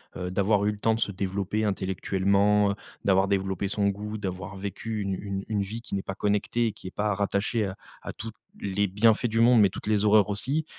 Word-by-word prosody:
heu, 90 0 -4
d'avoir 100 +2 +2
eu 105 - +2
le 105 - -8
temps 110 +1 +2
de - - -4
se 100 - +1
développer 100 +2 -2
intellectuellement, 100 +1 +2
heu, - - -3 0.3
d'avoir 95 0 +4
développé 95 0 -1
son 100 0 +1
goût, 105 +2 -4
d'avoir 95 -1 -5
vécu 100 +3 -4
une 100 -1 -2
une 100 0 -4
une 105 -2 0
vie 110 +4 -5
qui 120 - -11
n'est 100 - 0
pas 95 - -6
connectée, 105 +4 0
et 110 - -1
qui 95 - -11
est - - -6
pas 105 0 0
rattachée 100 +3 0
à 95 -1 -5 0.3
à - - -6
tous 115 +1 -7 0.3
les 100 +1 0
bienfaits 110 +5 +3
du 115 0 +1
monde, 120 0 +6
mais 100 - +5
toutes 95 - -8
les 105 -1 +2
horreurs 105 -1 +5
aussi? 135 +10 -1
100 Hz, 230 wpm, -27 LUFS, 95-105 Hz, 0.3 s, monde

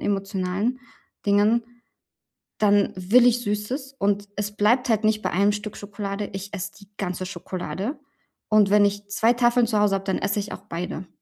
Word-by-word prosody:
emotionalen 195 +4 -1 0.5
Dingen, 210 +4 +4 1.0
dann 205 -1 +3
will 210 +7 +5
ich 245 0 +3
Süßes. 250 +7 -3
Und 205 -1 0
es 205 0 -2
bleibt 240 +5 +3
halt 215 0 +2
nicht 215 0 +2
bei - - -1
einem 200 +3 +3
Stück 210 0 -6
Schokolade. 200 0 -5
Ich 195 +2 -6
esse 200 0 -4
die 200 - -17
ganze 185 -1 -3
Schokolade. 185 - -5 0.5
Und 215 -2 +5
wenn 210 0 +6
ich 205 0 -2
2 225 +3 +3
Tafeln 240 -1 +3
zu 215 -2 +1
Hause 205 -1 +3
habe, 195 - -3
dann 190 - 0
esse 200 +1 0
ich 205 +1 -5
auch 190 - -7
beide. 175 +1 -5
205 Hz, 175 wpm, -24 LUFS, 195-215 Hz, 1.0 s, wenn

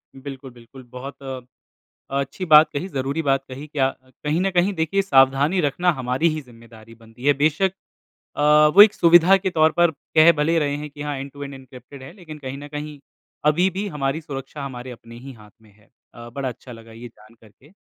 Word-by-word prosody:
बिल्कुल-बिल्कुल, 130 -2 -11
बहुत 135 +2 -9
अ, 130 -1 -6 0.8
अच्छी 140 +7 -5
बात 155 -1 +7
कही, 165 +7 -4
ज़रूरी 140 +1 -3
बात 135 -1 0
कही 135 +4 -9
क्या 140 -3 0 0.4
कहीं 150 +3 0
ना 195 +1 0
कहीं, 185 +2 +1
देखिए, 165 +5 0
सावधानी 140 +2 +3
रखना 170 +4 +1
हमारी 130 +4 -1
ही 155 - -4
ज़िम्मेदारी 115 -2 -16
बनती 115 +2 -17
है। 145 - +5
बेशक 160 +6 +1 0.6
अ, - - -3 0.3
वो 205 - +11
एक 215 0 +6
सुविधा 175 +3 +6
के 190 0 -2
तौर 160 -2 +3
पर 175 -1 +5 0.3
कह 160 +2 +8
भले 150 +2 +1
ही 165 - +2
रहे 145 -2 -1
है 150 +1 -7
कि 145 0 -10
हाँ, 145 -1 -4
एंड-टू-एंड 140 0 -8
एनक्रिप्टेड 130 +1 -14
चैट 130 - -10
है, - - -13
लेकिन 160 -5 -11
कहीं 135 -1 -7
ना 145 +1 -10
कहीं 150 0 -7 0.5
अभी 175 +5 +3
भी 195 +3 -4
हमारी 150 -2 -3
सुरक्षा 140 -1 -8
हमारे 130 -2 -8
अपने 115 -1 -13
ही 135 +2 -10
हाथ 105 -3 -17
में 110 - -21
है। 105 -1 -27 0.3
अ, 120 0 -11
बड़ा 135 +1 -4
अच्छा 125 +1 -10
लगा 115 0 -14
ये 120 +2 -10
जान 110 0 -21
करके। 115 +6 -21
140 Hz, 205 wpm, -22 LUFS, 130-155 Hz, 0.8 s, वो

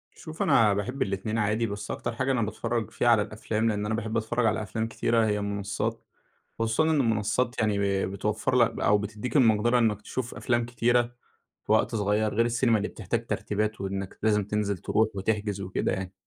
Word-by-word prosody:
شوف 160 -1 -8
أنا 105 -3 +4
باحب 125 +7 -3
الاتنين 100 +2 -1
عادي، 110 +2 +1
بس 100 -1 -5
أكتر 115 - -4
حاجة 130 +2 0
أنا 125 - +1
باتفرّج 115 +1 -2
فيها - - 0
على 115 -3 +6
الأفلام، 110 +1 -1
لأن 105 -1 -1
أنا 110 +1 -1
باحب 110 0 -2
أتفرّج 115 +2 0
على 110 0 +1
أفلام 110 +3 -3
كتيرة 115 0 +1
هي 105 -1 0
المنصات، 100 -1 -3 0.6
خصوصًا 115 +5 +1
إن 155 -2 +2
المنصات 115 +1 +1
يعني 105 -2 +1 0.3
ب - - -5
بتوفر 105 +5 -1
لك 120 -3 +5
ب - - -8
أو 105 - +4
بتدّيك 105 +6 -4
المقدرة 120 -1 +4
إنّك 105 -3 +1
تشوف 125 +1 -4
أفلام 120 -2 0
كتيرة 120 0 +2 0.6
في - - +1
وقت - - +2
صغيّر 105 0 +1
غير 115 +2 +3
السينما، 120 -1 +2
اللي 105 - -2
بتحتاج 115 +3 -3
ترتيبات 105 -1 -2
وإنّك 95 0 -4
لازم 105 -1 +2
تنزل 105 -1 -1
تروح 110 +5 +1
وتحجز 105 0 -1
وكده 95 -1 -1
يعني. 95 -1 -4
110 Hz, 190 wpm, -27 LUFS, 105-115 Hz, 0.6 s, على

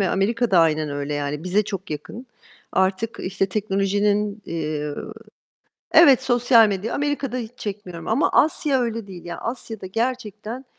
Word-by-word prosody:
ve 190 - +2
Amerika 230 +5 +1
da 185 - +5
aynen 155 -2 +2
öyle. 145 +1 -3
Yani, 145 +2 -3
bize 195 +4 +2
çok 195 -4 -6
yakın. 215 - -7 0.5
Artık, 190 +4 0
işte, 190 +1 -1
teknolojinin, 205 +1 0
eee 155 -2 -3 1.0
Evet, 280 -6 +7
sosyal 240 -3 +5
medya 200 +3 -2
Amerika'da 285 -3 -1
hiç 230 -3 -4
çekmiyorum 190 -5 -6
ama 230 +8 +2
Asya 290 -3 +3
öyle 230 -3 -2
değil. 180 -3 -10
Ya, 175 - -6
Asya'da 225 -4 -6
gerçekten 225 +2 -3
205 Hz, 145 wpm, -23 LUFS, 180-235 Hz, 1.0 s, Evet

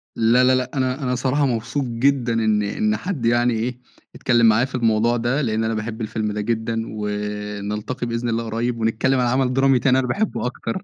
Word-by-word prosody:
لا، 120 +3 +4
لا، 130 0 +4
لا، 125 0 -2
أنا 130 +2 -1
أنا 125 -1 0
صراحة 135 +3 +1
مبسوط 125 +3 -1
جدًا 120 0 +1
إن 110 -2 +2
إن 105 +1 0
حد 160 - -4
يعني 120 +1 +3
إيه، 120 +2 -3 0.4
إتكلم 120 -2 +2
معايا 115 +3 +4
في 135 - -8
الموضوع 115 0 +2
ده، 120 +6 0
لأن 110 -3 0
أنا 110 0 0
باحب 110 +1 -4
الفيلم 110 -1 -2
ده 105 0 -3
جدًا. 115 +1 -1
ونلتقي 105 +3 -4
بإذن 115 +1 -2
الله 115 0 -1
قريب 115 +1 -2
ونتكلّم 120 +4 +1
عن 125 - +2
عمل 130 +1 +1
درامي 135 -1 +3
تاني 130 0 +3
أنا 125 - -1
باحبه 200 - -1
أكتر. 115 -2 -4
120 Hz, 200 wpm, -21 LUFS, 110-130 Hz, 0.4 s, لا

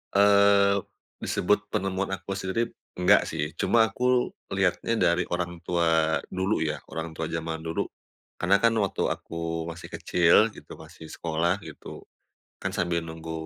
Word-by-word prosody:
Eee, 100 0 +5 0.4
disebut 105 +3 0
penemuan 95 -2 -1
aku 100 - -9
sendiri 100 +5 -1 0.2
enggak 90 +3 +4
sih, 75 -1 -3
cuma 115 -1 +4
aku 125 0 +1 0.2
lihatnya 95 +3 +1
dari 85 -4 +2
orang 85 -1 -3
tua 80 -3 +2
dulu 95 -2 0
ya, 75 - -2
orang 80 0 -5
tua 80 0 -4
jaman 80 0 -3
dulu. 80 0 -2 0.6
Karena 90 +3 +3
kan 115 - +5
waktu 100 -3 0
aku 85 0 -4
masih 85 +1 -8
kecil 85 -1 +3 0.2
gitu - - -11
masih 80 - -12
sekolah 80 +1 0
gitu, - - -10 0.6
kan - - -1
sambil 85 -1 0
nunggu 80 0 -8
90 Hz, 145 wpm, -26 LUFS, 80-100 Hz, 0.6 s, Eee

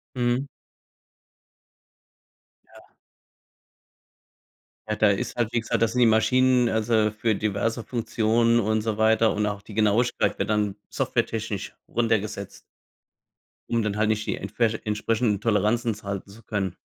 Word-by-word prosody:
Mhm. 125 +2 0 2.2
Ja. - - -19 2.0
Ja, 105 - -1
da 105 - +4
ist 100 +4 -2
halt, 115 -1 -1
wie 120 - +1
gesagt 115 - -2
da 115 - +4
sind 125 - -1
die 120 - +6
Maschinen 125 +3 +3
also, 110 -1 +2
für 110 +1 0
diverse 110 +3 -1
Funktionen 115 0 +1
und 110 0 0
so 110 -1 -2
weiter. 110 +1 +3
Und 105 0 0
auch 105 -1 -4
die 105 - -12
Genauigkeit 110 +3 +1
wird - - -1
dann 105 -2 0
softwaretechnisch 105 -2 -2
runtergesetzt. 110 -4 -1 1.1
Um 115 -1 +1
dann 105 -1 -2
halt 105 0 +1
nicht 110 0 0
die - - -1
entsprech 115 -2 -1
entsprechenden 105 0 0
Toleranzen 110 +2 +1
zu 105 - -15
halten 100 0 -5
zu 110 +3 -14
können. 100 -4 -3
110 Hz, 140 wpm, -25 LUFS, 105-115 Hz, 2.2 s, die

